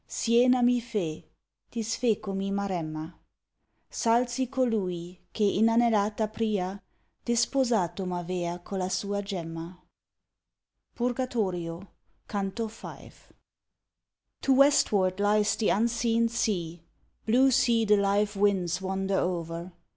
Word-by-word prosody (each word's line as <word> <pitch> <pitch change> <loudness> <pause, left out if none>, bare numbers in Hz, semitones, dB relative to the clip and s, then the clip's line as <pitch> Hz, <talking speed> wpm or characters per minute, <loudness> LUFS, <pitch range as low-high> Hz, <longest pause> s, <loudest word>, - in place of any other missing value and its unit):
Siena 245 +2 +3
mi 245 0 +4
fe; 205 -10 -4 0.4
disfecomi 215 -4 -1
Maremma; 170 -5 -3 0.8
Salsi 240 +2 +1
colui, 185 -9 -2
che, 215 - -1
inanellata 215 0 +2
pria, 200 -4 -2 0.4
Disposato 230 -7 +1
m'avea 175 -1 -3
colla 185 -1 -3
sua 200 +2 -2
gemma. 170 -3 -6 1.2
Purgatorio, 205 -8 -2 0.4
Canto 200 +2 -3
V. 220 - -11 1.3
To 270 - +3
westward 205 -9 +3
lies 210 +1 +2
the 220 - +1
unseen 230 +1 +2
sea, 180 -8 -2 0.5
Blue 260 +4 +4
sea 235 -2 +3
the 210 0 +5
live 200 +1 +1
winds 190 -3 +1
wander 190 0 -1
o'er. 170 0 -3
205 Hz, 95 wpm, -28 LUFS, 185-230 Hz, 1.3 s, the